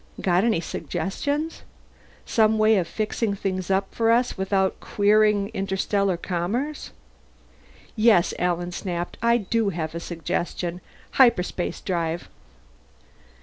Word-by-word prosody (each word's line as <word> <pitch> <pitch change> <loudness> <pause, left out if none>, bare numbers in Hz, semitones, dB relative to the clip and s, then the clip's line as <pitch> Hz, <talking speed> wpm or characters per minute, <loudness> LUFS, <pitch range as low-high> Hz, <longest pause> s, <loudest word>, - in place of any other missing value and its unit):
"Got 180 0 +2
any 225 -7 +2
suggestions? 290 - -3 0.6
Some 220 -1 +3
way 215 0 +4
of 175 -3 0
fixing 215 +1 -2
things 185 -2 -3
up 195 0 0
for 225 -1 +1
us 240 +2 +2
without 190 0 0
queering 210 0 +2
interstellar 195 -1 0
commerce?" 200 - -3 1.1
"Yes," 215 -6 +4
Alan 175 0 -1
snapped. 175 -1 -4
"I 235 0 +4
do 220 0 0
have 160 -4 -4
a 170 - -4
suggestion. 175 +1 -3 0.3
Hyperspace 185 -9 +2
drive!" 170 -2 -2
195 Hz, 110 wpm, -24 LUFS, 175-220 Hz, 1.1 s, way